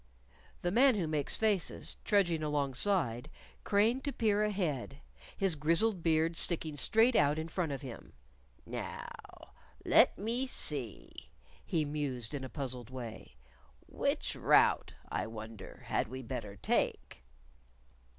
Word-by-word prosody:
The 175 - +1
Man 255 +4 +5
Who 190 -5 0
Makes 155 -3 -1
Faces, 210 -5 0
trudging 175 -6 +2
alongside, 145 - 0 0.3
craned 225 +6 +2
to 285 - -1
peer 210 -5 +1
ahead, 165 -10 -2 0.4
his 195 -3 +2
grizzled 170 +7 +2
beard 165 0 +2
sticking 160 -3 +2
straight 225 - +3
out 145 -2 +4
in 160 0 -3
front 165 -2 -2
of 140 0 -5
him. 125 -4 -9 0.5
"Now, - - -8 0.3
let - - +5
me 235 +6 0
see," 130 - -3 0.3
he 160 -3 0
mused 140 -5 -3
in 140 -2 -4
a 130 - -6
puzzled 125 -5 -5
way. 125 -4 -8 0.5
"Which - - -1
route, - - +4 0.2
I - - -1
wonder, 110 -2 -9
had - - 0
we 130 +3 -7
better 105 -3 -5
take?" 65 -8 -1
155 Hz, 130 wpm, -32 LUFS, 130-200 Hz, 0.5 s, Man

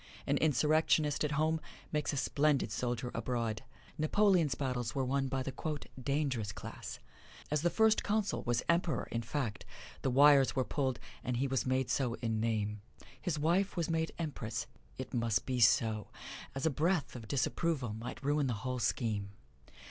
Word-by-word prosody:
An - - +2
insurrectionist 155 0 +3
at 150 -1 0
home 155 +2 +1 0.3
makes 150 -1 0
a 145 - -3
splendid 145 +1 +2
soldier 120 0 -2
abroad. 115 -3 -2 0.4
Napoleon's 170 -3 +3
battles 125 -4 -2
were 135 -1 +1
won 135 +1 0
by 130 0 -1
the 135 - -4 0.5
"dangerous 135 -6 0
class." - - -7 0.5
As 150 -1 +2
the 175 - +3
First 220 +5 +3
Consul 210 -1 0
was 120 0 0
Emperor 170 -1 +1
in 115 - -1
fact, 120 -2 -3 0.4
the - - +1
wires 140 +1 +6
were 130 - +2
pulled, 130 -2 -1 0.2
and 125 0 -1
he 135 - +1
was 135 -1 0
made 130 -1 +1
so 125 -3 +1
in 110 -2 -2
name. 105 -2 -1 0.4
His 175 -5 -1
wife 175 +7 +1
was 170 -1 0
made 160 0 0
Empress: 125 -8 -3 0.3
it 130 - -6
must 115 -3 +1
be 130 -1 -1
so, 110 -1 +4 0.5
as 135 - -2
a 160 - +3
breath 160 +1 0
of 115 -3 -8
disapproval 140 -2 0
might 115 +5 -7
ruin 145 0 +2
the 120 - 0
whole 125 0 -1
scheme. 110 -3 0
135 Hz, 165 wpm, -33 LUFS, 120-155 Hz, 0.5 s, wires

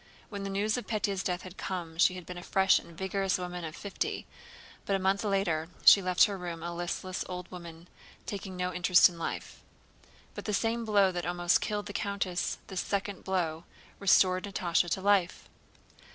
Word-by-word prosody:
When 200 -2 -6
the 195 - -4
news 205 +4 0
of 245 - -6
Pétya's 205 -4 -1
death 180 -1 -2
had 185 0 -10
come 170 -3 -5
she 185 - +5
had 180 -2 -8
been 180 +1 -7
a - - -9
fresh 190 +1 +3
and 170 - -14
vigorous 190 0 0
woman 180 -1 -5
of 160 0 -6
fifty, 200 -1 -3 0.6
but 195 - 0
a - - +3
month 195 +2 +1
later 180 -6 0 0.2
she 200 - +9
left 180 -1 +4
her 200 -2 +1
room 170 -2 -6
a 170 0 -4
listless 175 +2 -3
old 180 0 -6
woman 170 -1 -10 0.4
taking 195 -2 -6
no 180 0 -2
interest 180 +1 +6
in 170 -1 -11
life. - - -5 0.7
But - - -8
the 210 - 0
same 230 +1 0
blow 200 -3 +4
that 175 -2 -3
almost 175 0 +2
killed 210 -1 -2
the 205 - -7
countess, 200 -3 -2
this 190 -2 -3
second 200 -1 -3
blow, 170 -4 -1 0.3
restored 185 -2 +4
Natásha 175 -3 0
to 190 - -1
life. 195 -3 +2
185 Hz, 190 wpm, -30 LUFS, 175-200 Hz, 0.7 s, she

